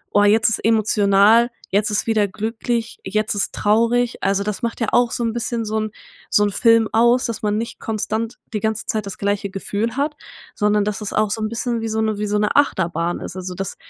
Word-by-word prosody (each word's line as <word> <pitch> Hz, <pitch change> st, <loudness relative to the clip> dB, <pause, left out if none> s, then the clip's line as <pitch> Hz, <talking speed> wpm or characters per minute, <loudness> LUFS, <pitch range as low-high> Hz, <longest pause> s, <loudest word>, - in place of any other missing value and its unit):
Oh, 205 Hz, -, +6 dB
jetzt 210 Hz, +1 st, +4 dB
ist 225 Hz, -, -2 dB
emotional. 215 Hz, +1 st, +4 dB, 0.2 s
Jetzt 205 Hz, +2 st, +2 dB
ist 210 Hz, -, 0 dB
wieder 220 Hz, -2 st, +2 dB
glücklich. 225 Hz, +3 st, -3 dB
Jetzt 215 Hz, +2 st, -1 dB
ist 200 Hz, -, -1 dB
traurig.“ 235 Hz, +3 st, +2 dB
Also, 195 Hz, 0 st, +1 dB
das 210 Hz, +3 st, -4 dB
macht 230 Hz, -1 st, -3 dB
ja 230 Hz, -, 0 dB
auch 245 Hz, -1 st, +3 dB
so 240 Hz, -, -2 dB
'n 230 Hz, -1 st, -1 dB
bisschen 235 Hz, -1 st, -2 dB
so 220 Hz, +1 st, -1 dB
'n 215 Hz, 0 st, -3 dB, 0.4 s
so 205 Hz, -, +3 dB
'n 205 Hz, -, +1 dB
Film 230 Hz, +1 st, +4 dB
aus, 240 Hz, +3 st, +4 dB
dass 230 Hz, -3 st, -4 dB
man 210 Hz, 0 st, 0 dB
nicht 230 Hz, +1 st, -5 dB
konstant 220 Hz, +1 st, -3 dB, 0.2 s
die 210 Hz, -, 0 dB
ganze 220 Hz, +1 st, -2 dB
Zeit 215 Hz, -2 st, -2 dB
das 200 Hz, -, -7 dB
gleiche 200 Hz, 0 st, -1 dB
Gefühl 210 Hz, +5 st, -3 dB
hat, 295 Hz, +2 st, -1 dB, 0.4 s
sondern 210 Hz, 0 st, +2 dB
dass 210 Hz, 0 st, -3 dB
es 210 Hz, -, -5 dB
auch 215 Hz, -1 st, +1 dB
so 220 Hz, -, -2 dB
'n 215 Hz, -, -1 dB
bisschen 230 Hz, 0 st, -2 dB
wie 225 Hz, -, -3 dB
so 220 Hz, 0 st, -2 dB
'ne 220 Hz, -2 st, 0 dB
wie 210 Hz, -, -1 dB
so 210 Hz, 0 st, 0 dB
'ne 210 Hz, 0 st, 0 dB
Achterbahn 175 Hz, -10 st, +1 dB
ist. 175 Hz, -, -7 dB
Also, 185 Hz, -1 st, -6 dB
das 195 Hz, 0 st, -4 dB
215 Hz, 230 wpm, -20 LUFS, 205-230 Hz, 0.4 s, Oh